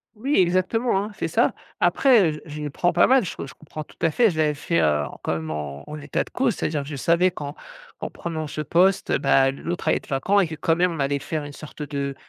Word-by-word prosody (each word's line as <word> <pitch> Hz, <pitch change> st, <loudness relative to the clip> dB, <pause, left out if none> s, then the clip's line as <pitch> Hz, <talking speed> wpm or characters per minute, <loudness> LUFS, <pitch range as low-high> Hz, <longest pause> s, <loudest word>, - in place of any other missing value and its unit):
Oui, 270 Hz, +7 st, -1 dB
exactement, 190 Hz, +4 st, +2 dB
hein, 210 Hz, -, -6 dB
c'est -, -, -1 dB
ça. -, -, +2 dB, 0.3 s
Après, 225 Hz, -, +4 dB
heu, 150 Hz, -, -8 dB
je 150 Hz, -1 st, -7 dB
j 145 Hz, -, -3 dB
prends 175 Hz, +5 st, +1 dB
pas 175 Hz, -, +5 dB
mal, 260 Hz, -3 st, +5 dB
j 175 Hz, -, -5 dB
je 135 Hz, -, -7 dB
comprends 155 Hz, 0 st, -8 dB
tout -, -, -20 dB
à 165 Hz, -, +3 dB
fait. 230 Hz, -1 st, +4 dB
Je 160 Hz, -, -7 dB
l'avais 150 Hz, -1 st, +3 dB
fait, 85 Hz, -, 0 dB
heu, 75 Hz, -2 st, +2 dB, 0.2 s
quand -, -, 0 dB
même 80 Hz, -1 st, -4 dB
en 75 Hz, -2 st, -5 dB
en 150 Hz, 0 st, -7 dB
état 145 Hz, -, -1 dB
de -, -, -16 dB
cause, 245 Hz, -5 st, +1 dB
c'est-à-dire 150 Hz, -2 st, -2 dB
je 145 Hz, +1 st, -6 dB
savais 170 Hz, +6 st, +3 dB
qu'en 145 Hz, -4 st, -7 dB, 0.4 s
en -, -, -4 dB
prenant 160 Hz, -3 st, -5 dB
ce 150 Hz, -, -4 dB
poste, 180 Hz, +6 st, +2 dB
bah, 135 Hz, 0 st, +4 dB
l'autre 170 Hz, +5 st, -5 dB
allait -, -, +4 dB
être -, -, -11 dB
vacant 165 Hz, +9 st, +2 dB
et 190 Hz, -, +3 dB
que 160 Hz, -, -6 dB
quand 165 Hz, +2 st, +1 dB
même 180 Hz, 0 st, +2 dB
on 160 Hz, -, -6 dB
allait 140 Hz, +1 st, 0 dB
faire 150 Hz, +1 st, -3 dB
une 145 Hz, -, -9 dB
sorte 150 Hz, 0 st, -9 dB
de 140 Hz, -2 st, -3 dB
155 Hz, 255 wpm, -24 LUFS, 140-180 Hz, 0.4 s, pas